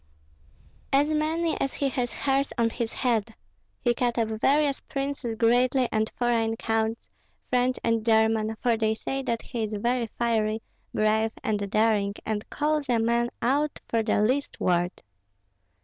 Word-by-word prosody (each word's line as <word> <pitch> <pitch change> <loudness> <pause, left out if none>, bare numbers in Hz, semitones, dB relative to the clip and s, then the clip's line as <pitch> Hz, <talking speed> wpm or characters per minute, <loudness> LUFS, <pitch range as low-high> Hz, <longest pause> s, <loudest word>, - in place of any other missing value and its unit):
"As 285 +2 +3
many 315 +2 0
as 270 - -1
he 280 - 0
has 245 -2 -2
hairs 275 0 0
on 230 -1 +2
his 235 -1 -3
head! 225 -3 0 0.5
He 240 - +2
cut 240 0 -1
up 225 -2 +1
various 275 +6 +2
princes 275 -4 -4
greatly 245 +2 +3
and 220 0 0
foreign 230 -2 +1
counts, 225 0 -1 0.4
French 250 0 +2
and 230 -1 +1
German, 220 -1 +2
for 240 -2 +3
they 220 -1 +1
say 270 +4 -3
that 235 -3 -2
he 240 -3 -4
is 215 -1 -2
very 235 +3 0
fiery, 220 -2 0 0.3
brave, 220 +1 +1
and 205 -2 -1
daring, 210 -1 +2
and 215 -1 -3
calls 300 -2 -1
a 240 - +3
man 235 +1 +1
out 285 +5 +1
for 230 - +1
the 220 -1 +1
least 265 +6 0
word." 175 0 0
235 Hz, 155 wpm, -26 LUFS, 220-260 Hz, 0.5 s, As